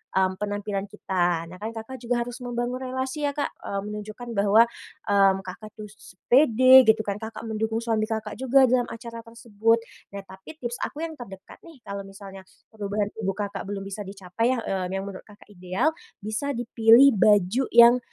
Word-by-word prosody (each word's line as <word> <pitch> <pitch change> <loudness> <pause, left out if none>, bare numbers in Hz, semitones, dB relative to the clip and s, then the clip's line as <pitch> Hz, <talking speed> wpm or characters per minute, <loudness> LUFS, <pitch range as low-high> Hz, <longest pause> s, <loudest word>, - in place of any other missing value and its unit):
mmm, 190 0 +1
penampilan 205 -1 -3
kita. 175 -5 -2
Nah 185 - -11
kan 215 - -4
Kakak 225 +4 -8
juga 240 0 -1
harus 245 +1 -8
membangun 245 +1 -3
relasi 260 +3 -3
ya 285 - -4
Kak, 290 - -2
mmm, 200 0 -4
menunjukkan 215 +3 -8
bahwa, 205 +3 +6 0.4
mmm, 195 -1 +4
Kakak 190 +4 -9
tuh 215 - -9
s 205 -3 -17 0.2
pede 255 -1 +7
gitu 220 0 +5
kan, 200 0 -4
Kakak 220 +1 -8
mendukung 220 +1 -2
suami 220 -2 0
Kakak 220 -1 -5
juga 265 +1 +4
dalam 250 -1 +2
acara 230 0 -8
tersebut. 230 -1 -1 0.3
Nah 200 - -6
tapi 190 +10 -13
tips 240 +1 -4
aku 310 +3 -4
yang 330 - -4
terdekat 195 -6 -11
nih, 285 -8 -16
kalau 200 0 -7
misalnya 195 0 -11 0.3
perubahan 205 -1 -3
tubuh 195 -3 -4
Kakak 200 -2 -5
belum 200 -1 -5
bisa 195 +1 -7
dicapai 200 +6 -2
yah, 235 - -4
eee, 190 -1 -3
yang 195 - -3
menurut 195 -1 -9
Kakak 210 -1 -18
ideal, 185 - -1 0.3
bisa 235 +7 -3
dipilih 235 +3 +5
baju 205 +5 +4
yang, 235 +1 +7
220 Hz, 180 wpm, -25 LUFS, 200-240 Hz, 0.4 s, pede